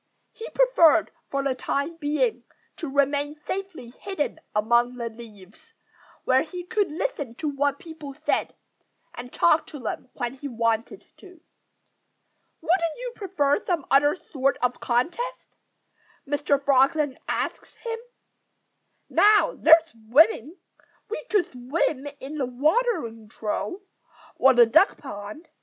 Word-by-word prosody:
He 455 - -9
preferred, 340 - +4 0.2
for 275 0 -1
the 275 -1 +1
time 280 +5 -3
being, 305 +10 0 0.3
to 320 - -5
remain 285 +1 +1
safely 375 -11 -5
hidden 375 -5 -3 0.2
among 235 +3 +2
the 235 -1 -4
leaves, 220 - -15 0.5
where 260 0 +3
he 355 +3 -6
could 410 +2 0
listen 300 - -3
to 305 - -4
what 285 0 0
people 310 -5 -10
said 310 +2 -1 0.6
and 245 0 -9
talk 325 -2 +3
to 295 - -8
them 245 +1 -5
when 245 -1 -3
he 270 +2 -7
wanted 230 -2 -1
to. 365 -4 -16 1.2
"Wouldn't 335 -1 +1
you - - -5
prefer 365 -4 0
some 345 -7 -1
other 290 +3 +5
sort 275 -6 -1
of 250 0 0
contest?" 355 - -2 0.7
Mr. 290 0 +1
Frog 275 -1 +4
then 295 -4 -1
asked - - -3
him. 460 -1 -3 1.1
"Now, 420 +1 +4
there's 325 0 +6
swimming! 275 - +2 0.5
We 460 - -4
could 415 -6 +2
swim 265 +2 -2
in 290 +3 -7
the 260 - 0
watering 255 - 0
trough, 215 - -3 0.6
or 265 -1 +5
the 240 -1 +8
duck 320 - +4
pond. 210 +4 -9
285 Hz, 130 wpm, -25 LUFS, 250-345 Hz, 1.2 s, the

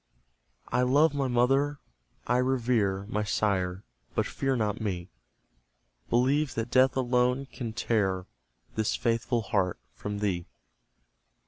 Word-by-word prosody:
I 125 - +2
love 145 +5 +4
my 140 -2 0
mother, 135 +4 +2 0.5
I 125 - +2
revere 120 -7 +1
My 105 0 -1
sire, 95 -2 0 0.3
but - - +2
fear 135 -1 -1
not 110 -3 -1
me 95 -4 -3 1.0
Believe 135 +5 +2
that 115 +1 -3
Death 130 0 +4
alone 125 +1 +2
can 120 -4 -6
tear 100 -5 0 0.5
This 110 -1 0
faithful 115 0 0
heart 95 -3 0 0.2
from 105 +11 -5
thee. 95 -4 -1
115 Hz, 120 wpm, -28 LUFS, 100-130 Hz, 1.0 s, love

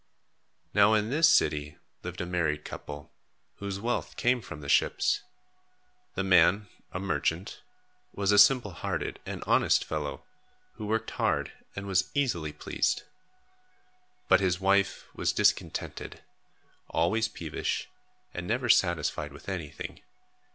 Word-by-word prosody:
Now 110 - +6
in 105 +2 0
this 165 +4 +5
city 75 - +2 0.2
lived - - -6
a - - -2
married 80 -4 -1
couple, 75 0 -8 0.5
whose 100 -1 -4
wealth 120 +3 -2
came 125 0 +2
from 85 -7 -9
the 70 - -8
ships. 80 - +2 0.9
The 95 - 0
man, 95 +2 +4 0.2
a 90 - -4
merchant, 95 -2 -2 0.5
was 100 0 0
a 105 - +6
simple 120 -1 +6
hearted 90 -3 -3
and - - -5
honest - - +3
fellow, 75 -2 -4 0.5
who 105 - -7
worked 110 +1 -1
hard - - 0 0.2
and 100 - -5
was 95 -1 +1
easily 95 - 0
pleased. - - -1 1.2
But 95 - +6
his 90 -2 +1
wife 100 +1 +2
was - - 0
discontented, - - -1 0.7
always 110 +7 +1
peevish 80 -7 -3 0.5
and 90 0 -5
never 120 +2 -1
satisfied 85 -8 +2
with - - -14
anything. 80 -6 -6
95 Hz, 130 wpm, -29 LUFS, 85-105 Hz, 1.2 s, Now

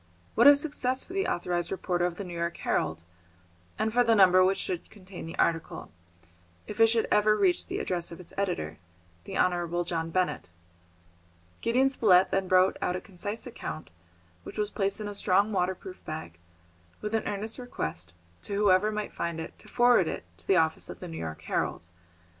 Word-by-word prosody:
What - - +6
a 285 - +10
success 280 -3 0
for 365 - -11
the 390 0 0
authorised 175 -1 -1
reporter 180 -2 0
of 175 - -5
the 200 - -5
New 180 -2 -8
York 170 0 -2
Herald, 80 +1 -1 0.7
and 215 0 0
for 245 +1 +5
the 230 -1 +4
number 185 -2 +7
which 190 +1 +2
should 180 -2 -4
contain 190 -4 -10
the 165 - -8
article, 165 - -1 0.7
if 210 +1 -8
it 225 - +8
should 225 0 +1
ever 215 0 +4
reach 190 -4 +2
the - - -3
address 175 -2 -3
of 170 - -9
its 180 - -12
editor, 175 - -2 0.5
the - - -5
Honourable 175 -1 +1
John 165 -1 -3
Benett! 180 - -1 1.1
Gideon 255 +4 +3
Spilett 190 -7 +4
then 195 -1 0
wrote 185 +1 +4
out 180 - 0
a - - -2
concise 205 +4 -6
account, 190 - -7 0.5
which - - -10
was 210 -1 -1
placed 195 0 -1
in 210 - -4
a 205 - -5
strong 200 +1 +2
waterproof 185 -1 -2
bag, 85 - -7 0.6
with 210 +1 -5
an 225 - 0
earnest 210 +4 -3
request 85 - -5 0.3
to 200 - -4
whoever 205 0 +4
might 210 -1 -4
find 170 -1 -3
it 160 - -8
to - - -14
forward 240 -7 +4
it - - -4
to 85 +1 -19
the - - +4
office 160 -1 +1
of - - -8
the 180 - -7
New 165 -1 -7
York 80 -1 -6
Herald. 85 - -2
185 Hz, 190 wpm, -28 LUFS, 170-215 Hz, 1.1 s, a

